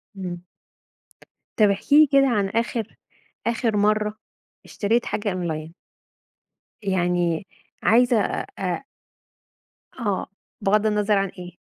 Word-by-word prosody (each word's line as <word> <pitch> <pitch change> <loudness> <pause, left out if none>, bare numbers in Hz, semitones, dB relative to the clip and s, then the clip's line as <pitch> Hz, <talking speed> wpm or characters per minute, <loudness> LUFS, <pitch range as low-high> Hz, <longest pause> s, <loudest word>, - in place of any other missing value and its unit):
إمم. 180 -2 -5 1.2
طب 210 - +6
احكِ 200 +8 -1
لي 305 +1 +8
كده 275 0 +5
عن 205 -5 +1
آخر 225 0 -2 0.5
آخر 230 -2 0
مرة 210 +1 +1 0.5
اشتريت 230 +3 0
حاجة 205 -1 -2
أونلاين. 160 -3 -4 1.1
يعني 175 -2 0 0.4
عايزة 240 +1 +4
أ - - -2
أ 185 +6 -2 1.1
آه. 205 -6 -2 0.3
بغض 210 +2 +2
النظر 210 -1 +2
عن 195 0 +1
إيه؟ 180 -1 -11
205 Hz, 110 wpm, -23 LUFS, 185-225 Hz, 1.2 s, لي